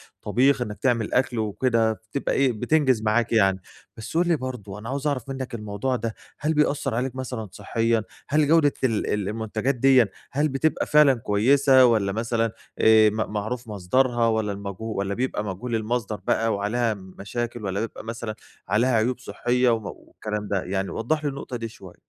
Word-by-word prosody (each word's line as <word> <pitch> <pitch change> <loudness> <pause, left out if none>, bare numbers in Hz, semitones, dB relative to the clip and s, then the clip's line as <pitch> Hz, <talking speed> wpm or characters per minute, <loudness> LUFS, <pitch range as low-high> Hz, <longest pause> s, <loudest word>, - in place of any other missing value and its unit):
الطبيخ 135 +2 +2
إنّك 105 -4 -4
تعمل 120 -5 0
أكْل 125 -2 +1
وكده، 110 +1 +1
فبتبقى 110 +5 -4
إيه 135 -2 +3
بتنجز 130 +1 +2
معاك 110 +2 +1
يعني. 95 -4 +3 0.4
بس 110 +8 -5
قُل 175 +1 +3
لي 170 - +3
برضو 125 -8 -6
أنا 110 - -7
عاوز 140 +2 -2
اعرف 135 -3 -2
منك 130 -3 -5
الموضوع 105 +4 -2
ده، 115 -2 -3 0.2
هل 155 +2 0
بيأثّر 145 -4 +1
عليك 130 +2 -2
مثلًا 125 -5 -5
صحيًا، 115 +3 0 0.3
هل 150 +1 +3
جودة 150 -2 +4
ال 115 -5 +1
ال 105 -2 -1
المنتجات 110 +4 -2
ديًِّا 130 -2 +5 0.2
هل 145 +3 +1
بتبقى 135 +4 0
فعلًا 150 -2 +6
كويسة 130 +4 +4
والّا 110 -5 +2
مثلًا 115 +1 -1 0.3
آآ 110 -1 +6
م - - -6 0.2
معروف 115 +4 -3
مصدرها 115 +4 +1
والّا 110 -2 0
المجهو 100 +1 -6
والّا 100 0 -1
بيبقى 120 -2 -2
مجهول 105 +5 -4
المصدر 110 -1 -2
بقى 115 0 +2
وعليها 110 +3 0
مشاكل، 105 +5 -6
والّا 95 +1 -2
بيبقى 115 +1 -5
مثلًا 115 -1 -5 0.3
عليها 120 +3 +2
عيوب 120 +3 +1
صحية 125 0 0
و 115 - +3 0.3
والكلام 105 -1 -5
ده؟ 100 -2 -1
يعني 95 +1 -2
وضّح 155 +7 -1
لي 145 - +1
النقطة 140 -2 -6
دي 115 -1 -4
شويّة. 95 -6 -13
115 Hz, 175 wpm, -24 LUFS, 105-130 Hz, 0.4 s, فعلًا